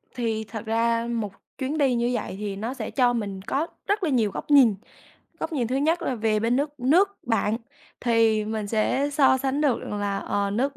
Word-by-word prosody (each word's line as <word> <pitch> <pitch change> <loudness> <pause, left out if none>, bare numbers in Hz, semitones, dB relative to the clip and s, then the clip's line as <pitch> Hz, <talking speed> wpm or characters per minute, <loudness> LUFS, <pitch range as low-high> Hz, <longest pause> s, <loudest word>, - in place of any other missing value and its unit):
Thì 225 -3 -1
thật 220 -1 -7
ra 230 +1 +1
một 220 -4 -2 0.3
chuyến 275 +3 -2
đi 275 -4 +3
như 240 +1 +1
vậy 240 - -3
thì 205 -2 -3
nó 220 +6 -4
sẽ 240 -5 -5
cho 245 -2 +3
mình 200 -5 -3
có 280 - -1 0.2
rất 405 0 +1
là 335 - +1
nhiều 230 -7 +2
góc 295 - -6
nhìn. 255 -7 +7 0.7
Góc - - -3
nhìn 255 -6 0
thứ 255 +3 -1
nhất 320 +5 +1
là 265 - -1
về 220 -2 +1
bên 230 +3 +1
nước 290 0 -2
nước 360 +11 +3
bạn 225 -2 +1 0.4
thì 225 -3 +3
mình 215 -1 -3
sẽ 230 +7 +1
so 275 -2 +4
sánh 270 +2 -1
được 285 -5 +2
rằng 205 - -5
là, 200 -1 -1
ờ, 200 0 -1
nước 260 +7 -1
235 Hz, 215 wpm, -25 LUFS, 220-275 Hz, 0.7 s, nhìn